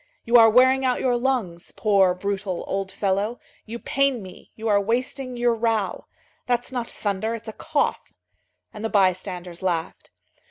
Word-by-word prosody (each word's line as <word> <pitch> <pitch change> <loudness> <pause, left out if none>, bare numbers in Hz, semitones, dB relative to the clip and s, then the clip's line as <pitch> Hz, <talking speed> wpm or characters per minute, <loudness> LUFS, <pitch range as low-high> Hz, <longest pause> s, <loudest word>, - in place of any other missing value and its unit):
"You 235 - +1
are 225 -1 +8
wearing 260 +3 +5
out 255 -1 +1
your 250 -2 +1
lungs, 240 -9 -2
poor, 195 -4 +3
brutal, 195 -1 -3
old 195 0 -3
fellow, 200 +4 -1 0.3
you 230 +2 -5
pain 275 -2 0
me, 185 - -13
you 225 +1 -5
are 205 -2 +4
wasting 250 +4 -2
your 240 0 +2
row. 225 -4 -1 0.4
That's 245 0 0
not 245 -2 -3
thunder, 215 +2 -2
it's 230 0 -10
a 220 - -5
cough." 305 +3 -1 0.6
And 210 - -8
the 225 - -1
bystanders 185 -3 0
laughed. 170 -3 -3
220 Hz, 160 wpm, -24 LUFS, 195-245 Hz, 0.6 s, are